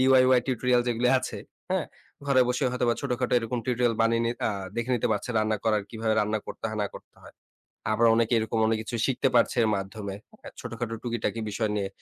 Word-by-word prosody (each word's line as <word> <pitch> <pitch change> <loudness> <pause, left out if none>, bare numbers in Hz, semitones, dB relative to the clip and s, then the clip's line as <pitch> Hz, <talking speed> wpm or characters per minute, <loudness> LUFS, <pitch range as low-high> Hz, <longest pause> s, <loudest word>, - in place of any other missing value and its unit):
DIY 130 -1 +5
tutorial 125 -1 +2
যেগুলি 120 +1 +1
আছে, 115 -4 -5 0.3
হ্যাঁ? 185 -3 0 0.4
ঘরে 135 -2 +4
বসে 125 +3 0
হয়তোবা 120 -2 +1
ছোটখাটো 125 -3 -2
এরকম 120 +1 -3
টিউটোরিয়াল 120 -2 +1
বানিয়ে 115 +1 +2
নি 115 - +1 0.2
আ - - 0 0.3
দেখে 120 +2 -2
নিতে - - 0
পারছে। 105 +4 -3
রান্না 110 0 +1
করার, 105 -2 +2
কিভাবে 110 -1 -1
রান্না 105 +1 0
করতে - - -8
হয় 110 - -5
না - - 0
করতে - - -13
হয়। - - -14 0.6
আবার 115 +2 +3
অনেকে 115 +1 +2
এরকম 110 0 -1
অনেক 110 - +2
কিছু 120 - -5
শিখতে 135 0 +1
পারছে 120 +1 +3
এর 110 - +2
মাধ্যমে, 100 0 -5 0.3
হ্যাঁ? - - -10
ছোটখাটো 115 -2 -4
টুকিটাকি 120 -1 -2
বিষয় 110 +1 -1
নিয়ে 100 -2 -1
115 Hz, 200 wpm, -27 LUFS, 110-125 Hz, 0.6 s, DIY